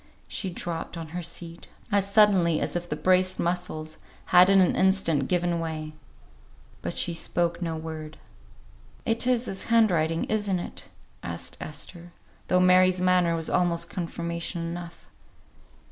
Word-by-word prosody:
She 190 - -3
dropped 170 -1 -5
on 165 -1 -7
her 175 +2 -5
seat, 170 0 -8 0.2
as 200 -1 +1
suddenly 195 -6 +4
as - - -3
if 175 0 -3
the - - -1
braced 185 +4 +2
muscles 170 -3 -3 0.3
had 180 +1 +8
in 195 0 +6
an 185 - +3
instant 190 -7 +2
given 175 -1 0
way. 155 -2 -4 0.9
But - - -5
she 175 - +1
spoke 170 +1 0
no 165 -2 -2
word. 155 -1 -7 0.9
"It 230 +1 +1
is 250 -1 +2
his 195 - -3
hand 230 -3 +4
writing 165 0 +1
isn't 205 -3 0
it?" 175 - -6 0.4
asked - - -6
Esther, 170 +3 -7 0.3
though 180 - +3
Mary's 185 0 +5
manner 180 -2 +3
was 165 -1 -3
almost 175 -2 +1
confirmation 170 -1 -4
enough. 170 0 -7
175 Hz, 145 wpm, -26 LUFS, 165-185 Hz, 0.9 s, had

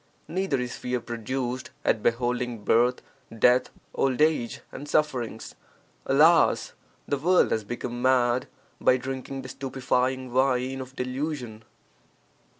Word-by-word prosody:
Neither 185 -6 -1
is 125 0 -3
fear 125 0 -2
produced 120 +2 -4 0.2
at 110 - +2
beholding 120 -1 -1
birth, 120 +4 +3 0.3
death, 125 +3 +4 0.2
old 135 -1 0
age, 150 -6 +1
and 145 +1 -8
sufferings. 125 -8 -1 0.5
(Alas), 160 +5 +4 0.3
the 140 - -1
world 180 +5 +3
has 110 - 0
become 120 +2 -5
mad 125 -1 +2 0.3
by 130 - +4
drinking 135 +1 -5
the 130 - -8
stupefying 130 -1 -1
wine 130 0 +1
of 130 +1 -10
delusion. 125 -3 -4
130 Hz, 120 wpm, -26 LUFS, 120-135 Hz, 0.5 s, death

